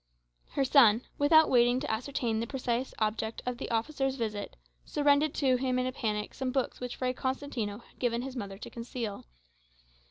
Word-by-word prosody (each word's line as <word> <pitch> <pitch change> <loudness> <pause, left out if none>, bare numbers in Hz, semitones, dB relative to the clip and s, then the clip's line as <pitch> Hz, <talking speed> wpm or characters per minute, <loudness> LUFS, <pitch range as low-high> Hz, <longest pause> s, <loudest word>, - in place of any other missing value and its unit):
Her 275 - +2
son, 245 -4 +6 0.2
without 315 +2 +6
waiting 245 0 +4
to 295 -1 -3
ascertain 230 -1 -1
the 230 - -2
precise 250 -1 -2
object 220 +1 -1
of 250 -1 -3
the - - -4
officer's 270 +3 0
visit, 215 -5 -4 0.3
surrendered 290 +1 +2
to 260 -3 +3
him 255 0 0
in 255 - +1
a 255 - -1
panic 210 -4 -2
some 260 -1 -2
books 265 -1 -1
which 250 -1 -5
Fray 255 -1 -1
Constantino 260 -5 -3
had 235 - -20
given 240 -1 0
his 265 0 -6
mother 200 -5 -5
to - - -8
conceal. 230 -3 -5
250 Hz, 180 wpm, -30 LUFS, 225-270 Hz, 0.3 s, son